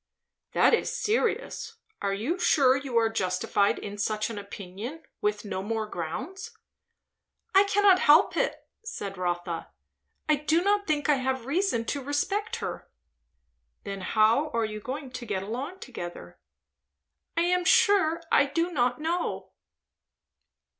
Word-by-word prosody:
"That - - +4
is 465 - +2
serious! 460 0 -1 0.3
Are 200 - 0
you 240 - -2
sure 265 -7 +4
you 265 -3 -2
are 225 -1 +4
justified 200 -1 +1
in 205 0 -7
such 215 +2 -1
an 210 - -5
opinion, 205 - -8 0.2
with 420 - -1
no 190 -2 -3
more 220 +2 -2
grounds?" 345 - -6 1.0
"I 390 +1 +7
cannot 400 -2 +5
help 310 +6 +5
it," - - -1 0.2
said 205 - -5
Rotha. 175 -2 -3 0.6
"I 305 -1 +4
do 315 +4 +1
not 405 +1 +2
think 300 -1 0
I 295 -2 +4
have 260 -2 -2
reason 290 - 0
to 280 +4 -2
respect 400 - -1
her." - - -6 0.9
"Then 195 -1 -5
how 225 +9 +3
are 230 -1 +2
you 215 0 -5
going 260 +4 -6
to 250 - -6
get 195 -3 -2
along 265 - -5
together?" 175 - -8 1.0
"I - - +4
am 360 +1 +2
sure 350 -3 +4
I 280 - +5
do 335 +5 -1
not 250 -5 +1
know." 335 +3 -2
270 Hz, 140 wpm, -27 LUFS, -, 1.0 s, I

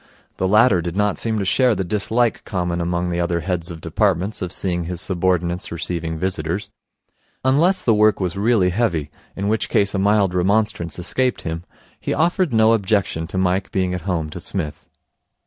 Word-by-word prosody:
The 95 - 0
latter 105 -2 +5
did 85 +1 -4
not 105 -1 +1
seem 110 -1 -1
to 100 - -1
share 125 +5 +3
the 95 - -1
dislike 110 +5 0
common 90 -2 -2
among 85 +1 -1
the 85 0 -2
other 85 0 0
heads 85 0 -2
of 80 -2 -8
departments 95 +4 0
of 90 -2 -3
seeing 90 -3 -2
his 90 0 -4
subordinates 90 -1 -1
receiving 85 -1 -2
visitors. 95 +4 -2 0.7
Unless 165 +9 +3
the 115 - +4
work 105 0 +4
was 90 -3 -2
really 100 -3 +2
heavy, 85 - -1 0.2
in 100 +1 -2
which 110 0 0
case 100 0 +2
a 100 - 0
mild 100 -2 +3
remonstrance 95 -2 0
escaped 125 +8 -1
him, 85 +1 -4 0.3
he - - -2
offered 175 0 +1
no 110 0 +4
objection 100 -6 0
to 90 - -5
Mike 95 +1 0
being 95 -1 0
at 90 - -3
home 80 -4 -1
to 90 - -6
Psmith. 85 -4 -4
95 Hz, 180 wpm, -21 LUFS, 85-105 Hz, 0.7 s, latter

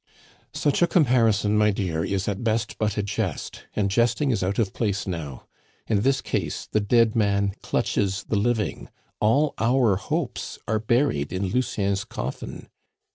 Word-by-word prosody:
"Such 145 +2 +1
a 175 - +5
comparison, 115 - +3
my 105 0 +4
dear, 90 -5 -1
is 95 +1 -2
at 100 +1 -2
best 115 -1 -1
but 110 -1 0
a 105 - +1
jest, 100 - -4
and 100 -2 +1
jesting 120 +5 +2
is 110 - 0
out 95 +2 -1
of 105 -5 0
place 100 -3 -1
now. 80 -8 -5 0.4
In 105 -3 +1
this 135 +3 +2
case - - -3
the 110 - 0
dead 110 +2 +3
man 100 -2 +2
clutches 100 +1 0
the - - -2
living. 110 +1 -1 0.3
All 140 +8 +3
our 115 -3 +3
hopes 100 - -3
are 110 0 +1
buried 115 - +1
in 95 +1 -1
Lucien's 100 -4 0
coffin." - - -6
105 Hz, 160 wpm, -25 LUFS, 100-115 Hz, 0.4 s, a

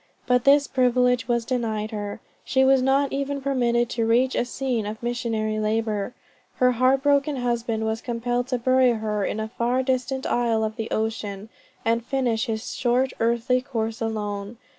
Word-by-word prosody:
But 250 -1 +2
this 285 +1 +6
privilege 250 -2 +2
was 235 -2 0
denied 220 -3 -2
her; 205 -1 -5 0.2
she 265 0 +2
was 265 -1 +5
not 270 +2 +2
even 280 0 -2
permitted 240 -3 +1
to 230 -2 0
reach 250 +3 +3
a - - 0
scene 245 -4 -2
of 215 +2 -7
missionary 225 -3 -1
labor. 215 +1 -1 0.4
Her 250 -1 +3
heart 255 +2 +2
broken 285 0 +2
husband 235 -3 -1
was 220 +1 -2
compelled 245 +1 -2
to 255 -1 0
bury 255 0 +3
her 215 -2 -2
in 210 - -2
a 220 - -2
far 245 +2 +1
distant 260 0 -1
isle 230 -2 +1
of 215 0 -2
the 225 -1 -4
ocean, 215 -2 -3 0.4
and 230 +1 +1
finish 250 -2 0
his 220 0 -3
short 250 +2 +1
earthly 235 +2 +1
course 225 -4 -3
alone. 210 -1 -3
240 Hz, 170 wpm, -24 LUFS, 220-255 Hz, 0.4 s, this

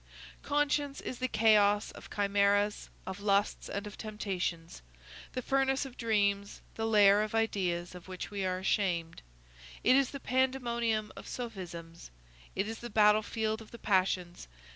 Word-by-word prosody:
Conscience 290 -1 0
is 250 - -6
the 255 - 0
chaos 210 -2 +4
of - - -12
chimæras, 205 0 +1 0.2
of 190 +1 -6
lusts, 200 0 +1
and 200 +1 -4
of 210 - -9
temptations; 185 - -4 0.5
the 255 - -3
furnace 270 +1 +1
of 260 -2 -9
dreams; 200 -3 0
the 225 0 -2
lair 205 -2 +6
of 215 +1 -2
ideas 180 -6 0
of 180 0 -11
which 185 +1 -6
we 200 -1 -3
are 185 -1 0
ashamed; 185 -3 -1 0.6
it 255 - +6
is 275 -1 +3
the 275 - -7
pandemonium 235 -5 0
of - - -10
sophisms; 175 -8 -7 0.5
it 195 +2 0
is 225 0 -5
the 240 - -7
battlefield 215 +1 +2
of 220 - -13
the 235 - -10
passions. 185 - 0
210 Hz, 150 wpm, -31 LUFS, 195-235 Hz, 0.6 s, lair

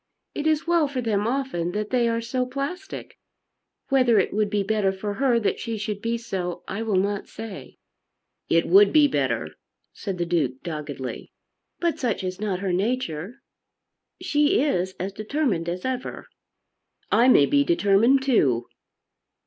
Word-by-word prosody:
It 300 - -2
is 310 0 +1
well 340 -3 +3
for 275 -2 -4
them 215 -3 0
often 235 -10 -2
that 210 0 -3
they 240 -2 +2
are 230 0 0
so 250 +2 -1
plastic. 280 +9 -6 0.7
Whether 255 -5 +4
it 195 - +2
would 210 0 +1
be 205 -1 0
better 205 -1 +1
for 205 +2 -4
her 245 +1 +2
that 210 - -1
she 230 -1 -4
should 210 -1 -4
be 230 +1 -1
so 185 -6 -4
I 200 +3 -4
will 220 -3 -1
not 200 +2 0
say." 200 -12 -9 0.7
"It 165 0 +3
would 200 +3 +6
be 300 -2 +6
better," 280 - -1 0.4
said 195 -4 -5
the 175 - -1
Duke 145 -7 -1
doggedly. 150 -5 -6 0.5
"But 340 -1 0
such 235 -8 -1
is 185 +1 -4
not 195 -3 -2
her 190 -2 -1
nature. 205 - -2 0.8
She 295 0 +2
is 185 -10 0
as 190 +2 -3
determined 215 - -1
as 180 +1 -4
ever." 260 -1 -4 0.9
"I 240 - +5
may 195 - +7
be 285 - +3
determined 260 - +3
too." 135 - +2
215 Hz, 160 wpm, -24 LUFS, 185-260 Hz, 0.9 s, may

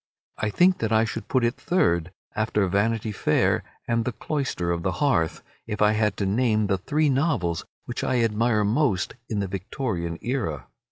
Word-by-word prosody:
I 105 - 0
think 180 - +4
that 110 -1 -1
I 110 0 +4
should 115 +1 -5
put 130 -2 +1
it 120 0 +2
third 85 - +1 0.2
after 105 -2 +1
"Vanity 110 +3 0
Fair" 105 - +1 0.2
and 115 -1 +1
"The 125 - -1
Cloister 120 - -2
and 85 - -3
the 95 +1 -1
Hearth" 110 - +1 0.2
if 105 - -4
I 105 0 +5
had 105 -2 +1
to 100 - -1
name 110 +1 +2
the 95 -1 0
three 150 - +1
novels 130 - 0 0.2
which - - -4
I 125 -2 +1
admire 115 -1 +2
most 105 -3 +1 0.2
in 105 -2 -1
the 100 - -2
Victorian 95 -3 -3
era. 80 - -2
110 Hz, 180 wpm, -25 LUFS, 95-125 Hz, 0.2 s, I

